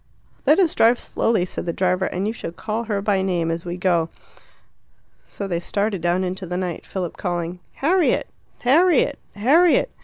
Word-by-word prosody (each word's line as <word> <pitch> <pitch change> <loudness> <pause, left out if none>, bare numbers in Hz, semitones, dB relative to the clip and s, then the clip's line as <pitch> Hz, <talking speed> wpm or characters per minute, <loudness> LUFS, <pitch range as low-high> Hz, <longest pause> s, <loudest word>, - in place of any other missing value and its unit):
"Let 300 - +6
us 365 -5 +3
drive 235 +2 +4
slowly," 220 -6 0
said 180 - -6
the 170 - -1
driver, 185 +1 +1
"and 185 +2 -3
you 220 - -1
shall 215 - -6
call 215 +6 -4
her 205 -3 -2
by 200 -2 +2
name 175 -3 0
as 165 +1 -4
we 175 0 -4
go." 175 -3 +1 1.2
So 200 - -6
they 170 -3 -1
started 200 +1 -1
down 175 +2 +1
into 185 +1 -4
the 180 +1 -3
night, 180 -2 -4
Philip 180 -3 -4
calling 175 -1 -3
"Harriet! 340 +4 +2 0.4
Harriet! 320 +5 +3 0.2
Harriet!" 305 - +4
190 Hz, 175 wpm, -22 LUFS, 175-230 Hz, 1.2 s, Let